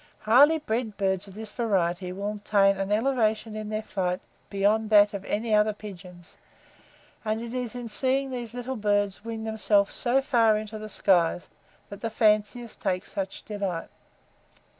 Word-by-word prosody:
Highly 275 +9 +6
bred 225 -7 -3
birds 190 -1 0
of 195 - -13
this 215 -1 -7
variety 185 -6 0
will 200 +3 -4
attain 195 -2 +4
an 195 +1 -3
elevation 220 -2 +1
in 215 0 -5
their 215 0 -3
flight 185 -3 -2 0.3
beyond 210 +2 +1
that 205 -1 +6
of 200 -1 -5
any 220 +1 -1
other 210 0 +4
pigeons; 180 -4 -12 0.9
and 215 0 -1
it 235 +1 -6
is 250 -2 -4
in 245 -1 -5
seeing 265 +4 0
these 240 -2 -6
little 245 +1 -4
birds 205 -1 0
wing 225 -1 -5
themselves 210 -2 +1
so 245 +2 +2
far 230 -5 +3
into 215 0 -6
the 215 0 -7
skies 175 -4 +2 0.4
that 200 - -9
the 230 - -2
fanciers 215 +2 +1
take 185 -2 -2
such 195 -1 -5
delight. 195 -5 -4
215 Hz, 160 wpm, -26 LUFS, 200-230 Hz, 0.9 s, Highly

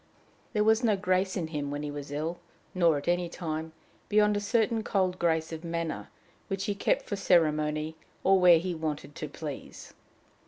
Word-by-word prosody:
There 210 -2 +3
was 220 +2 +4
no 215 -4 +3
grace 185 0 +1
in 165 -3 -2
him 145 -3 -3
when 145 +1 -4
he 145 - -3
was 145 -1 -7
ill, 155 +4 -3 0.3
nor 170 -4 +3
at 140 - -7
any 175 0 +1
time, 160 -1 -4 0.4
beyond 210 0 +4
a - - +1
certain 225 +2 +1
cold 185 -3 0
grace 160 -1 +1
of 160 0 -6
manner, 165 -1 -3 0.4
which 195 -1 -2
he 205 - 0
kept 200 - +1
for 205 - -3
ceremony, 155 -4 +2 0.3
or 190 0 +5
where 180 -2 +8
he 180 +2 -2
wanted 155 -2 -4
to 155 - -5
please. 145 -1 -8
170 Hz, 185 wpm, -29 LUFS, 155-195 Hz, 0.4 s, where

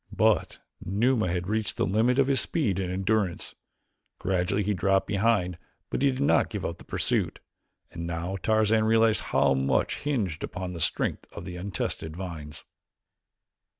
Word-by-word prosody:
But - - +2 0.3
Numa 110 +3 +1
had 90 0 -2
reached 110 0 -1
the - - +2
limit 115 +6 +2
of 140 - +5
his 135 -2 +3
speed 110 - 0
and 90 -2 -2
endurance. 95 -1 -1 0.6
Gradually 95 +2 0
he 105 +2 0
dropped 95 +1 +2
behind 100 -4 +1 0.3
but - - -1
he 140 - +5
did 130 -1 -3
not 145 - +3
give 105 -4 -4
up 85 0 -4
the - - -12
pursuit, - - -1 0.5
and 85 0 -5
now 85 +3 -3
Tarzan 110 +1 +3
realized 110 0 +4
how - - +3
much 65 0 +1
hinged 110 - -2
upon 90 0 -5
the 85 - -6
strength - - -1
of 85 - -8
the 90 -1 -6
untested 90 -3 -4
vines. 80 -5 -7
95 Hz, 160 wpm, -27 LUFS, 90-110 Hz, 0.6 s, of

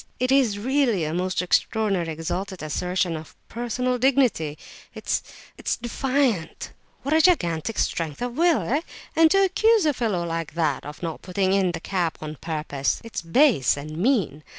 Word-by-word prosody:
It 255 +1 +1
is 255 -7 +3
really 240 - +1
a 155 +1 -2
most 180 0 -1
extraordinary, 195 -2 +1
exalted 175 +3 -4
assertion 180 +2 -1
of 155 0 -9
personal 250 +2 -2
dignity, 245 - +2 0.4
it's—it's - - -4
defiant! 240 - -1 0.3
What 280 +3 0
a 320 - +5
gigantic 205 - +2
strength 160 -4 -1
of 245 0 -3
will, 335 +1 +3
eh? 285 +6 0 0.3
And 325 0 +6
to 390 +3 +4
accuse 425 +1 +3
a 300 - +3
fellow 210 -9 -1
like 165 -2 -4
that 155 -6 0
of 150 +4 -10
not 165 -2 -4
putting 190 +1 0
in 190 -3 +2
the 165 - -4
cap 175 -2 -2
on 155 -1 -7
purpose; 150 -4 -2
it's 230 - -5
base 175 - +3
and 155 +2 -7
mean! 180 - 0
190 Hz, 160 wpm, -24 LUFS, 165-255 Hz, 0.4 s, And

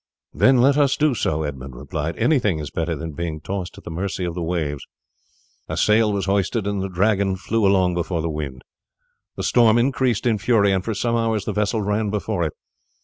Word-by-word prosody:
"Then 130 -2 +4
let 140 +3 +4
us 140 -2 +3
do 150 -2 +3
so," 80 -8 -1
Edmund 65 -3 -6
replied; 75 +5 -4
"anything 110 - +2
is 75 -1 -6
better 85 0 -2
than 80 +2 -6
being 80 0 -4
tossed 95 +1 -5
at - - -12
the - - -7
mercy 90 +2 -3
of 85 - -3
the 90 - -4
waves." 80 -4 -2 0.9
A - - -3
sail 105 0 +3
was 100 -1 -1
hoisted, 100 +2 0
and 100 -1 -1
the 95 - -3
Dragon 100 +1 +1
flew 105 +2 0
along 95 -2 +3
before 85 -1 -2
the - - -1
wind. 70 -4 -5 0.7
The - - -4
storm 115 -2 +4
increased 125 -2 +1
in 115 -3 +2
fury, 100 -1 +3
and 95 -1 0
for 110 +1 -3
some 115 +3 0
hours 115 -3 0
the - - -2
vessel 105 +1 0
ran 105 +1 0
before 105 -2 -2
it. 80 - -2
100 Hz, 205 wpm, -22 LUFS, 85-110 Hz, 0.9 s, Then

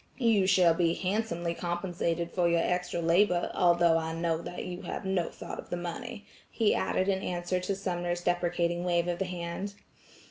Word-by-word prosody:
You 225 -7 +3
shall 185 -3 +5
be 170 0 +2
handsomely 180 -4 -1
compensated 175 -1 -2
for 175 -2 +2
your 170 0 +3
extra 180 -1 -1
labor, 175 +2 +3
although 170 -2 +4
I 160 0 -3
know 165 -1 0
that 180 - -6
you 180 -1 -6
have - - -5
no 190 -3 0
thought - - -8
of - - -9
the 175 - -2
money," 175 +4 -6 0.2
he 225 -3 +2
added 185 - 0
in 190 -1 +1
answer 175 0 -1
to 190 +2 -2
Sumner's 175 -2 -2
deprecating 175 -1 0
wave 175 -1 +1
of 175 -1 -1
the 190 - 0
hand. 180 +3 -5
175 Hz, 180 wpm, -29 LUFS, 170-185 Hz, 0.2 s, shall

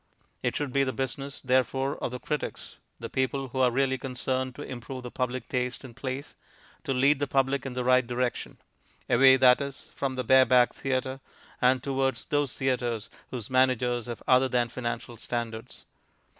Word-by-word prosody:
It - - -1
should 145 -3 -2
be 140 - +3
the 130 - 0
business, 135 +1 -4
therefore, 130 +2 +1
of - - -3
the 125 +1 -6
critics 150 +3 -5 0.2
(the - - -5
people 135 0 -1
who 130 - -4
are 130 -1 +5
really 130 +1 +1
concerned 130 0 -2
to 145 - -7
improve 130 0 -7
the 125 - -7
public 125 0 -3
taste 125 +1 -2
in 125 - -10
plays) 135 +2 -5 0.5
to - - -1
lead 135 +2 +3
the 145 - 0
public 135 0 +1
in 130 - -5
the 125 0 -2
right 125 0 +4
direction; 125 0 -2 0.5
away, 130 +2 +6
that 125 0 +6
is, 140 -1 -6
from 135 -1 -2
the 130 - -2
Bareback 125 0 +5
Theatre, 130 0 -2 0.4
and 125 0 +3
towards 135 -1 -1
those 145 -3 0
theatres 120 -4 -1 0.2
whose 120 -2 -6
managers 125 -2 +2
have 120 -2 -6
other 130 0 +5
than 120 -2 +1
financial 120 -1 -5
standards. 115 -1 -5
130 Hz, 175 wpm, -28 LUFS, 125-135 Hz, 0.5 s, away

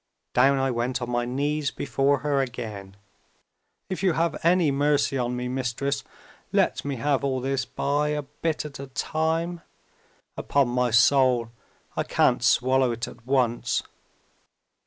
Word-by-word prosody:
Down 135 +2 +4
I 135 0 +1
went 125 +2 -1
on 120 -1 -4
my 120 0 0
knees 145 +3 -1
before 135 +1 0
her 140 -2 +1
again! 110 -6 -6 0.9
'If 185 - -4
you 190 -3 +3
have 165 +1 -1
any 170 -2 +4
mercy 145 0 +1
on 125 -1 -1
me, 125 0 -3
Mistress, 130 +2 -2 0.5
let - - +1
me 140 -1 -3
have 140 +2 0
all 135 -2 0
this 135 +1 -1
by 145 +2 -1
a 150 0 -1
bit 150 +3 -3
at 145 -3 -8
a 140 - -6
time. 160 +5 -1 0.7
Upon 140 -3 +1
my 125 0 +1
soul, 120 0 +4 0.4
I - - 0
can't - - +2
swallow 130 0 +3
it 115 +1 -3
at 115 - -13
once!' 125 -2 +1
135 Hz, 150 wpm, -25 LUFS, 125-145 Hz, 0.9 s, Down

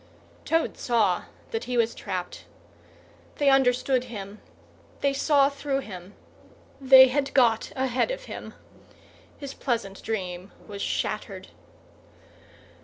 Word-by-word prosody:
Toad 325 0 0
saw 215 -7 +1 0.3
that 450 -1 -3
he 250 -1 -2
was 230 -1 +2
trapped. 180 -1 -6 0.9
They 285 -2 +3
understood 255 -1 +2
him, 210 -3 -8 0.6
they 280 -1 +2
saw 280 0 +3
through 280 -1 -2
him, 190 -4 -10 0.7
they 260 -1 +8
had 275 +1 -1
got 235 -4 +3
ahead 260 - 0
of - - -4
him. - - -9 0.8
His 280 -2 -7
pleasant 225 -6 -3
dream 185 -3 -5
was 200 -2 -7
shattered. - - -3
250 Hz, 110 wpm, -26 LUFS, 210-275 Hz, 0.9 s, they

